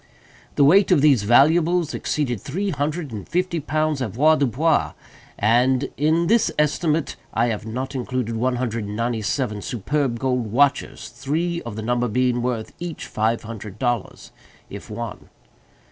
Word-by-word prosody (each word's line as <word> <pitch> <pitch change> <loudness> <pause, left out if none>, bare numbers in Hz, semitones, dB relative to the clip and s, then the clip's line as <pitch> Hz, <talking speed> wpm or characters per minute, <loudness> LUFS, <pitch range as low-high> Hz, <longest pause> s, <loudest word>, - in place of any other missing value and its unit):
The 145 - +4
weight 190 +8 +5
of 175 -6 +4
these 140 -6 +5
valuables 160 +9 +3
exceeded 125 -9 -2
three 190 +8 -2
hundred 150 0 -2
and 105 -4 -7
fifty 175 0 0
pounds 155 -1 -1
avoirdupois; 145 - +2 0.4
and 125 +5 +2
in 160 +4 +2
this 225 +5 +3
estimate 150 +1 0 0.2
I 115 +1 +2
have 105 -1 -4
not 130 +5 -4
included 125 -3 -3
one 125 +3 0
hundred 115 -3 -2
and 105 +1 -6
ninety 115 0 -1
seven 105 -2 -2
superb 125 +4 -1
gold 125 -3 -1
watches; 135 +1 +1
three 170 +4 -2
of 110 - -6
the 110 - -5
number 120 +1 0
being 125 +1 +1
worth 120 -3 -3
each 170 -2 -6
five 110 +2 -1
hundred 105 -2 -8
dollars, 120 -3 -3 0.4
if - - -9
one. - - -7
130 Hz, 150 wpm, -22 LUFS, 115-155 Hz, 0.4 s, weight